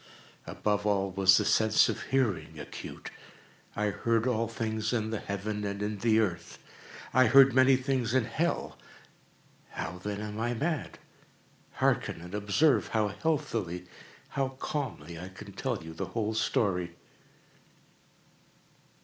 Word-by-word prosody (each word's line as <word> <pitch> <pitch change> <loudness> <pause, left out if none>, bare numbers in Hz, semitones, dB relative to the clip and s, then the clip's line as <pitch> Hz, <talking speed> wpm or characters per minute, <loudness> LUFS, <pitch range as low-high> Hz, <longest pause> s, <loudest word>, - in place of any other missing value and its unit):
Above 105 -1 -1
all 100 -2 +1
was 95 0 +5
the - - +1
sense 110 0 +4
of - - -3
hearing 125 -10 0
acute. - - -8 0.6
I 105 0 0
heard 115 +2 0
all 115 -2 +1
things 110 -1 -2
in 110 -2 -1
the 110 - -2
heaven 105 +1 -4
and 100 0 -3
in 105 -1 -3
the 110 0 +3
earth. 90 -6 -2 0.6
I 130 0 +6
heard 135 -1 +7
many 130 +1 +6
things 130 -2 -1
in 130 -3 +3
hell. 160 +9 -2 0.9
How, 90 +2 -5
then, 100 +2 -4
am 105 0 -5
I 120 +1 0
mad? 155 +4 -2 0.8
Hearken! - - 0
and 90 +2 -10
observe 105 +9 +2
how 110 -2 +1
healthily—how 115 - -3
calmly 85 - -4
I 90 +2 -7
can 100 +2 -11
tell 120 -7 -3
you 80 0 -8
the 80 - -4
whole 110 -1 -2
story. 95 -6 0
110 Hz, 135 wpm, -29 LUFS, 100-125 Hz, 0.9 s, heard